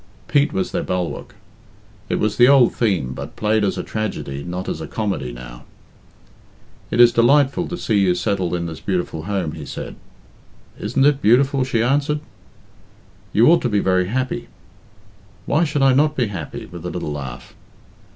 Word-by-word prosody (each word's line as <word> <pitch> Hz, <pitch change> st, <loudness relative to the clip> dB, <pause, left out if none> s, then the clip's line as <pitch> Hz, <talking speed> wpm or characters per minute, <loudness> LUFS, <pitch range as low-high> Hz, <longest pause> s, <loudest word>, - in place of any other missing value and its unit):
Pete 145 Hz, +1 st, +2 dB
was 185 Hz, +1 st, -2 dB
their 175 Hz, -, -1 dB
bulwark. 90 Hz, -, -4 dB, 0.7 s
It -, -, +1 dB
was 105 Hz, -1 st, 0 dB
the 120 Hz, -, +7 dB
old 135 Hz, -3 st, +6 dB
theme, 95 Hz, -, 0 dB
but -, -, -8 dB
played 110 Hz, 0 st, +1 dB
as 100 Hz, -, 0 dB
a -, -, -3 dB
tragedy, 85 Hz, -10 st, -4 dB
not 90 Hz, +1 st, -5 dB
as 80 Hz, -, -3 dB
a 80 Hz, -, -5 dB
comedy, 100 Hz, -, -3 dB
now. -, -, -10 dB, 1.3 s
"It -, -, -2 dB
is 120 Hz, -1 st, +8 dB
delightful 140 Hz, +7 st, +3 dB
to 175 Hz, -, -5 dB
see 110 Hz, -10 st, +1 dB
you 95 Hz, -2 st, +3 dB
settled 90 Hz, -1 st, -1 dB
in 85 Hz, -1 st, -2 dB
this 80 Hz, -2 st, -6 dB
beautiful 90 Hz, -4 st, -3 dB
home," 95 Hz, -6 st, -2 dB
he 80 Hz, -1 st, -8 dB
said. -, -, -7 dB, 0.8 s
"Isn't 135 Hz, 0 st, +1 dB
it 145 Hz, -1 st, +3 dB
beautiful?" 135 Hz, +5 st, +3 dB
she 115 Hz, -3 st, 0 dB
answered. 145 Hz, +4 st, +1 dB, 1.1 s
"You 115 Hz, -, +4 dB
ought 170 Hz, -, +4 dB
to 125 Hz, -, 0 dB
be 105 Hz, -, +1 dB
very 95 Hz, -2 st, +2 dB
happy." 130 Hz, +4 st, -2 dB, 1.0 s
"Why 155 Hz, +4 st, +2 dB
should 145 Hz, -2 st, 0 dB
I 135 Hz, -1 st, +5 dB
not 150 Hz, +3 st, +3 dB
be 120 Hz, -6 st, 0 dB
happy?" 85 Hz, -7 st, -6 dB
with 85 Hz, -2 st, -10 dB
a 90 Hz, -, -3 dB
little 85 Hz, -4 st, -4 dB
laugh. 70 Hz, -4 st, -7 dB
105 Hz, 175 wpm, -20 LUFS, 90-135 Hz, 1.3 s, is